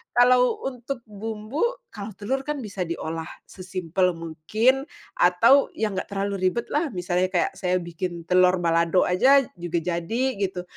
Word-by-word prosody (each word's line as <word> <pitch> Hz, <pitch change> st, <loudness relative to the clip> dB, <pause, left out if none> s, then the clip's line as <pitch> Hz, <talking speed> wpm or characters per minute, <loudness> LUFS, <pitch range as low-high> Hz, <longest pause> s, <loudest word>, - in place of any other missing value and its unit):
Kalau 250 Hz, +1 st, +4 dB
untuk 250 Hz, 0 st, -5 dB
bumbu 215 Hz, -, -4 dB, 0.3 s
kalau 210 Hz, 0 st, -6 dB
telur 260 Hz, +7 st, -1 dB
kan 300 Hz, -2 st, -2 dB
bisa 200 Hz, -3 st, -4 dB
diolah 165 Hz, -1 st, -4 dB, 0.2 s
sesimpel 185 Hz, -1 st, -1 dB
mungkin 215 Hz, -, 0 dB, 0.3 s
atau 280 Hz, -, +5 dB
ya 215 Hz, -1 st, -1 dB
enggak 185 Hz, -, -3 dB
terlalu 195 Hz, -1 st, -1 dB
ribetlah. 295 Hz, -, -1 dB
Misalnya 180 Hz, 0 st, 0 dB
kayak -, -, +1 dB
saya 185 Hz, -1 st, 0 dB
bikin 170 Hz, 0 st, -5 dB
telur 180 Hz, 0 st, +5 dB
balado 170 Hz, +1 st, +3 dB
aja 270 Hz, +10 st, +5 dB
juga 175 Hz, 0 st, -3 dB
jadi 180 Hz, +10 st, -1 dB
gitu, 185 Hz, -2 st, -2 dB
195 Hz, 140 wpm, -24 LUFS, 175-245 Hz, 0.3 s, atau